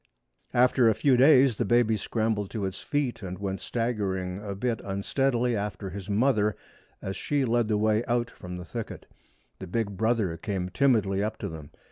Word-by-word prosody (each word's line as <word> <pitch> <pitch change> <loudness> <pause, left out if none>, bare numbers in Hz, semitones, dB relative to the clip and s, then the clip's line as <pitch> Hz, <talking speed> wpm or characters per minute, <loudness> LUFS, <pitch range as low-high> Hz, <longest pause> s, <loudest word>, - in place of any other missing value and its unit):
After 125 -1 +5
a 110 - +2
few 135 +2 +3
days 130 -2 +6
the - - +1
baby 120 -2 +3
scrambled 110 -1 -1
to 105 0 -4
his 95 0 -3
feet 145 -6 -2
and 90 -2 -5
went 95 -1 -4
staggering 100 -6 -2
a 100 -2 -4
bit 115 +2 -2
unsteadily 120 +5 0
after 100 -2 -4
his 100 +1 -7
mother 105 -2 +2 0.5
as 95 0 -3
she 145 -2 0
led 120 -1 +1
the 105 -1 +1
way 110 +1 +2
out 120 0 +1
from 90 0 -8
the 90 - -7
thicket. 115 +1 -6 0.5
The 95 - -7
big 100 +1 -2
brother 110 -6 +1
came 95 -2 -3
timidly 100 -4 +2
up 110 - -3
to 100 - -4
them. 80 -3 -9
110 Hz, 180 wpm, -27 LUFS, 95-120 Hz, 0.5 s, days